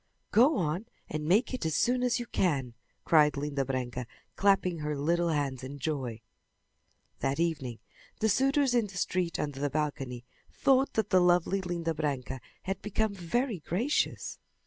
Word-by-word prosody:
"Go 255 Hz, +7 st, +5 dB
on 175 Hz, +6 st, -1 dB, 0.2 s
and 150 Hz, 0 st, -3 dB
make 210 Hz, +10 st, +3 dB
it 255 Hz, -, -3 dB
as 160 Hz, -2 st, 0 dB
soon 245 Hz, +1 st, +2 dB
as 250 Hz, 0 st, +1 dB
you 240 Hz, -, -4 dB
can!" 140 Hz, -, 0 dB, 0.3 s
cried 150 Hz, -3 st, +5 dB
Linda 140 Hz, -1 st, -1 dB
Branca, 125 Hz, -2 st, -3 dB, 0.3 s
clapping 195 Hz, -4 st, +2 dB
her 150 Hz, -1 st, -2 dB
little 170 Hz, +4 st, +1 dB
hands 140 Hz, -5 st, -1 dB
in 135 Hz, +2 st, -6 dB
joy. 130 Hz, -6 st, -3 dB, 1.0 s
That 135 Hz, +3 st, -1 dB
evening 150 Hz, -9 st, -1 dB, 0.4 s
the 220 Hz, -, +2 dB
suitors 270 Hz, +4 st, +3 dB
in 235 Hz, -3 st, +2 dB
the 195 Hz, -2 st, -9 dB
street 180 Hz, -2 st, 0 dB
under 145 Hz, -2 st, -3 dB
the 145 Hz, 0 st, 0 dB
balcony 135 Hz, -4 st, -3 dB, 0.3 s
thought 270 Hz, 0 st, +3 dB
that 220 Hz, -3 st, 0 dB
the 185 Hz, -, +6 dB
lovely 180 Hz, +2 st, +3 dB
Linda 170 Hz, -2 st, -2 dB
Branca 135 Hz, -4 st, -3 dB, 0.2 s
had 195 Hz, +1 st, -3 dB
become 210 Hz, +1 st, 0 dB
very 200 Hz, +4 st, -1 dB
gracious. 215 Hz, -, -1 dB
170 Hz, 160 wpm, -30 LUFS, 145-205 Hz, 1.0 s, the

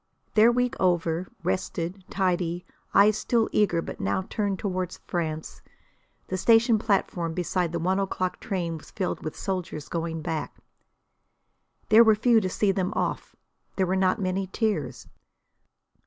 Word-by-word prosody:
Their 220 Hz, +2 st, +6 dB
week 245 Hz, 0 st, +1 dB
over, 175 Hz, -1 st, +1 dB, 0.2 s
rested, 170 Hz, -, -2 dB
tidy, 180 Hz, -2 st, -1 dB, 0.3 s
eyes 210 Hz, +2 st, +5 dB
still 230 Hz, -2 st, +1 dB
eager 175 Hz, -5 st, +2 dB
but -, -, -7 dB
now 100 Hz, -, 0 dB
turned 200 Hz, -3 st, -1 dB
toward 185 Hz, -3 st, -3 dB
France, 160 Hz, -3 st, -4 dB, 0.6 s
the 185 Hz, -, -3 dB
station 225 Hz, +3 st, +4 dB
platform 175 Hz, -6 st, 0 dB
beside 180 Hz, -1 st, -1 dB
the 170 Hz, -, -2 dB
one 185 Hz, +4 st, +1 dB
o'clock 185 Hz, -2 st, -2 dB
train 170 Hz, -4 st, -3 dB
was -, -, -15 dB
filled 185 Hz, -3 st, -3 dB
with 155 Hz, -, -5 dB
soldiers 180 Hz, -6 st, -4 dB
going 165 Hz, -1 st, -3 dB
back. 155 Hz, -2 st, -4 dB, 1.3 s
There 220 Hz, +2 st, +8 dB
were 220 Hz, -1 st, +5 dB
few 230 Hz, +1 st, +4 dB
to 185 Hz, -, -1 dB
see 200 Hz, +2 st, +1 dB
them 190 Hz, -1 st, -1 dB
off; -, -, -2 dB, 0.4 s
there 190 Hz, -, +2 dB
were 185 Hz, +1 st, 0 dB
not 190 Hz, +3 st, +2 dB
many 190 Hz, 0 st, -1 dB
tears. 180 Hz, -, -2 dB
185 Hz, 145 wpm, -26 LUFS, 170-205 Hz, 1.3 s, There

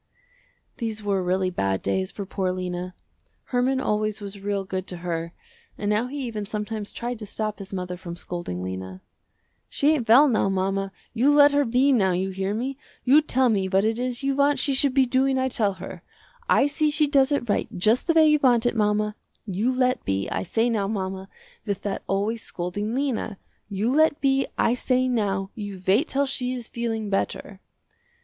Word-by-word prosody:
These 220 Hz, -4 st, -4 dB
were 200 Hz, -2 st, 0 dB
really 185 Hz, +1 st, 0 dB
bad 95 Hz, -, -1 dB
days 95 Hz, -1 st, -1 dB
for 200 Hz, -, -6 dB
poor 190 Hz, -1 st, -1 dB
Lena. 180 Hz, 0 st, -4 dB, 0.5 s
Herman 255 Hz, +1 st, 0 dB
always 215 Hz, -3 st, -1 dB
was 200 Hz, -1 st, -8 dB
real 200 Hz, 0 st, -2 dB
good 185 Hz, 0 st, -4 dB
to 180 Hz, -, -5 dB
her 165 Hz, -1 st, -2 dB, 0.5 s
and 205 Hz, 0 st, -1 dB
now 215 Hz, +4 st, +1 dB
he 280 Hz, +1 st, -5 dB
even 225 Hz, -4 st, -4 dB
sometimes 210 Hz, 0 st, -4 dB
tried 240 Hz, -1 st, -4 dB
to 210 Hz, -, -6 dB
stop 215 Hz, +1 st, -3 dB
his 195 Hz, 0 st, -8 dB
mother 180 Hz, -2 st, -4 dB
from 170 Hz, -1 st, -7 dB
scolding 175 Hz, -, -5 dB
Lena. 95 Hz, 0 st, -6 dB, 0.7 s
"She 295 Hz, +2 st, +2 dB
ain't 245 Hz, -8 st, -2 dB
well 270 Hz, +6 st, +8 dB
now 220 Hz, -6 st, +2 dB
mama, 195 Hz, +1 st, -1 dB, 0.2 s
you 250 Hz, +5 st, +3 dB
let 290 Hz, 0 st, +7 dB
her 285 Hz, 0 st, +2 dB
be 255 Hz, +4 st, +3 dB
now 195 Hz, -8 st, +3 dB
you 190 Hz, +2 st, -1 dB
hear 190 Hz, +2 st, -2 dB
me. 260 Hz, +4 st, -3 dB, 0.2 s
You 280 Hz, +5 st, +6 dB
tell 260 Hz, -4 st, +2 dB
me 195 Hz, -4 st, +1 dB
what 195 Hz, +2 st, +2 dB
it 225 Hz, +1 st, 0 dB
is 250 Hz, +1 st, -3 dB
you 275 Hz, 0 st, +1 dB
want 285 Hz, +1 st, +3 dB
she 275 Hz, +1 st, +1 dB
should 270 Hz, 0 st, +1 dB
be 270 Hz, -1 st, +5 dB
doing, 265 Hz, +2 st, +2 dB
I 260 Hz, 0 st, +1 dB
tell 210 Hz, -5 st, 0 dB
her. -, -, -9 dB, 0.5 s
I -, -, +5 dB
see 300 Hz, +1 st, +1 dB
she 305 Hz, 0 st, +2 dB
does 280 Hz, -1 st, +3 dB
it 285 Hz, -4 st, 0 dB
right 205 Hz, -, 0 dB
just 220 Hz, -, +2 dB
the 335 Hz, -, +4 dB
way 320 Hz, -1 st, +6 dB
you 300 Hz, 0 st, +4 dB
want 245 Hz, -3 st, +4 dB
it 240 Hz, -, +1 dB
mama. 210 Hz, -1 st, +1 dB, 0.3 s
You 210 Hz, +5 st, 0 dB
let 255 Hz, 0 st, +1 dB
be, 95 Hz, 0 st, -1 dB
I 95 Hz, -, -2 dB
say 225 Hz, -, 0 dB
now 215 Hz, -4 st, 0 dB
mama, 190 Hz, -2 st, -4 dB, 0.3 s
with 200 Hz, -3 st, -3 dB
that 200 Hz, -1 st, -3 dB
always 210 Hz, +4 st, -1 dB
scolding 205 Hz, +6 st, -4 dB
Lena. 255 Hz, -7 st, -2 dB, 0.3 s
You 205 Hz, +4 st, 0 dB
let 310 Hz, 0 st, +3 dB
be, 270 Hz, -1 st, +2 dB
I 230 Hz, -, +3 dB
say 255 Hz, +1 st, +1 dB
now, 200 Hz, -5 st, -1 dB
you 205 Hz, -3 st, -6 dB
wait 220 Hz, -, +3 dB
till 280 Hz, +1 st, +1 dB
she 255 Hz, -2 st, 0 dB
is 240 Hz, -2 st, -6 dB
feeling 225 Hz, -3 st, -3 dB
better." 195 Hz, 0 st, -2 dB
215 Hz, 200 wpm, -25 LUFS, 195-260 Hz, 0.7 s, well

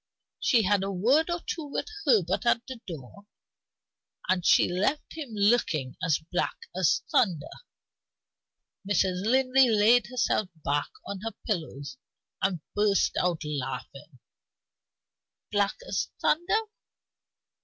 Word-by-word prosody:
She 235 Hz, -5 st, +3 dB
had 200 Hz, 0 st, +2 dB
a 195 Hz, +1 st, -2 dB
word 255 Hz, -, +2 dB
or 345 Hz, 0 st, -2 dB
two 325 Hz, -, -3 dB
with 285 Hz, -, -3 dB, 0.2 s
Herbert 200 Hz, -3 st, +2 dB
at 235 Hz, 0 st, +2 dB
the 260 Hz, -1 st, -7 dB
door; 170 Hz, +5 st, -9 dB, 1.0 s
and 185 Hz, -1 st, +1 dB
she -, -, +5 dB
left 200 Hz, +12 st, -1 dB
him 305 Hz, -5 st, -6 dB
looking 200 Hz, -, +1 dB
as 165 Hz, -4 st, +3 dB
black -, -, -1 dB, 0.2 s
as -, -, +2 dB
thunder." 190 Hz, -, +2 dB, 1.4 s
Mrs. 190 Hz, -2 st, +1 dB
Linley 260 Hz, +2 st, +4 dB
laid 225 Hz, +3 st, +4 dB
herself 235 Hz, -5 st, 0 dB, 0.2 s
back 145 Hz, +1 st, 0 dB, 0.2 s
on 200 Hz, -, -5 dB
her 225 Hz, 0 st, -4 dB
pillows 145 Hz, -, -4 dB, 0.4 s
and 185 Hz, -4 st, 0 dB
burst 205 Hz, -2 st, +2 dB
out 175 Hz, -2 st, 0 dB
laughing. 140 Hz, 0 st, -6 dB, 1.3 s
"Black 205 Hz, -1 st, +1 dB
as -, -, -1 dB
thunder? 375 Hz, +8 st, +2 dB
200 Hz, 120 wpm, -27 LUFS, 170-245 Hz, 1.4 s, she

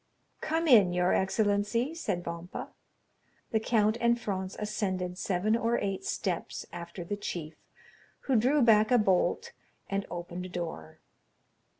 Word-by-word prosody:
"Come 325 Hz, +1 st, 0 dB
in, 205 Hz, -, +6 dB
your 180 Hz, +1 st, +2 dB
excellency," 205 Hz, +7 st, +1 dB
said 195 Hz, -, -3 dB
Vampa. 170 Hz, +1 st, -6 dB, 0.8 s
The 220 Hz, -, +2 dB
count 220 Hz, 0 st, +2 dB
and 235 Hz, 0 st, +3 dB
Franz 190 Hz, -4 st, -3 dB
ascended 185 Hz, -4 st, -2 dB
seven 200 Hz, +4 st, +1 dB
or 235 Hz, 0 st, +1 dB
eight 195 Hz, -1 st, -2 dB
steps -, -, -3 dB
after 170 Hz, +1 st, -7 dB
the 205 Hz, +4 st, -3 dB
chief, 170 Hz, -6 st, -5 dB, 0.7 s
who 265 Hz, -, 0 dB
drew 260 Hz, +5 st, +4 dB
back 220 Hz, -1 st, +5 dB
a 250 Hz, -, +5 dB
bolt 195 Hz, -5 st, +1 dB, 0.4 s
and 195 Hz, 0 st, -2 dB
opened 175 Hz, +1 st, -5 dB
a -, -, -12 dB
door. 160 Hz, -, -6 dB
200 Hz, 135 wpm, -29 LUFS, 180-230 Hz, 0.8 s, in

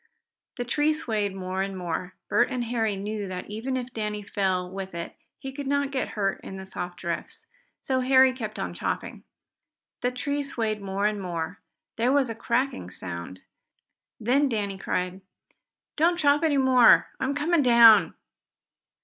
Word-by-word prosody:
The 245 Hz, -, -3 dB
tree 295 Hz, +5 st, +2 dB
swayed 215 Hz, -10 st, -2 dB
more 185 Hz, 0 st, -3 dB
and 195 Hz, 0 st, -3 dB
more. 180 Hz, +1 st, -4 dB
Bert -, -, +3 dB
and 250 Hz, -1 st, -2 dB
Harry 225 Hz, -3 st, 0 dB
knew 205 Hz, +1 st, -4 dB
that 185 Hz, +2 st, -6 dB
even 250 Hz, +5 st, -2 dB
if 255 Hz, 0 st, -6 dB
Danny 210 Hz, -1 st, -3 dB
fell 190 Hz, -2 st, -1 dB
with 190 Hz, -2 st, -6 dB
it 170 Hz, 0 st, -6 dB, 0.2 s
he 270 Hz, -1 st, -7 dB
could 280 Hz, 0 st, -6 dB
not 285 Hz, 0 st, 0 dB
get 265 Hz, -2 st, -1 dB
hurt 195 Hz, -2 st, 0 dB
in 190 Hz, -, -7 dB
the 190 Hz, -, -8 dB
soft 180 Hz, -1 st, -6 dB
drifts. 170 Hz, -2 st, -5 dB, 0.4 s
So 260 Hz, -1 st, 0 dB
Harry 260 Hz, 0 st, +5 dB
kept 220 Hz, -4 st, -6 dB
on -, -, -3 dB
chopping. -, -, -4 dB, 0.8 s
The 245 Hz, -, +1 dB
tree 285 Hz, +3 st, -2 dB
swayed 225 Hz, -6 st, -2 dB
more 195 Hz, +1 st, -2 dB
and 210 Hz, -1 st, 0 dB
more. 175 Hz, 0 st, -4 dB, 0.4 s
There 240 Hz, +3 st, +2 dB
was 270 Hz, -4 st, +2 dB
a -, -, -3 dB
cracking 235 Hz, -, -1 dB
sound. 90 Hz, 0 st, -7 dB, 0.8 s
Then 265 Hz, +5 st, +2 dB
Danny 200 Hz, -4 st, -2 dB
cried: 180 Hz, 0 st, -2 dB, 0.8 s
"Don't 340 Hz, +3 st, +3 dB
chop 290 Hz, -2 st, +3 dB
any 310 Hz, -3 st, +2 dB
more 260 Hz, -2 st, +6 dB
I'm 265 Hz, +2 st, -1 dB
coming 310 Hz, +3 st, +2 dB
down!" 235 Hz, -4 st, +7 dB
220 Hz, 165 wpm, -26 LUFS, 190-265 Hz, 0.8 s, down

